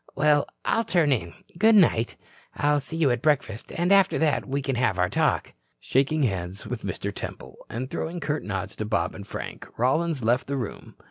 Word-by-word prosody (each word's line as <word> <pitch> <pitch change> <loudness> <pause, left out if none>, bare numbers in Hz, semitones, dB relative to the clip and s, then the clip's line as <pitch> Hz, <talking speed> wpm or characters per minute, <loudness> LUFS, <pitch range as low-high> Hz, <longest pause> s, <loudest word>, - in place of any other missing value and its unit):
Well, 145 0 +3 0.2
I'll 230 - +2
turn 170 -8 +2
in. 85 -10 -1 0.2
Good 220 +2 +6
night. 140 - +4 0.4
I'll 145 0 +2
see 155 +4 -6
you 150 -5 +3
at 120 -1 -1
breakfast 130 -7 0
and 175 +3 0
after 200 -1 +5
that 155 -3 +1
we 140 +1 -2
can 135 -1 -1
have 120 -6 +1
our 90 0 +1
talk." - - +1 0.3
Shaking 140 +3 +1
hands 95 -4 -2
with 120 -2 -4
Mr. 100 +1 -4
Temple - - -7
and 125 +3 -4
throwing 165 +5 -4
curt 150 0 -2
nods 95 -3 -4
to 110 - -2
Bob 105 -1 0
and 100 -1 -9
Frank, - - -7
Rollins 145 +3 +1
left 120 +3 +2
the 140 0 -2
room. 120 -6 -6
135 Hz, 195 wpm, -26 LUFS, 110-155 Hz, 0.4 s, Good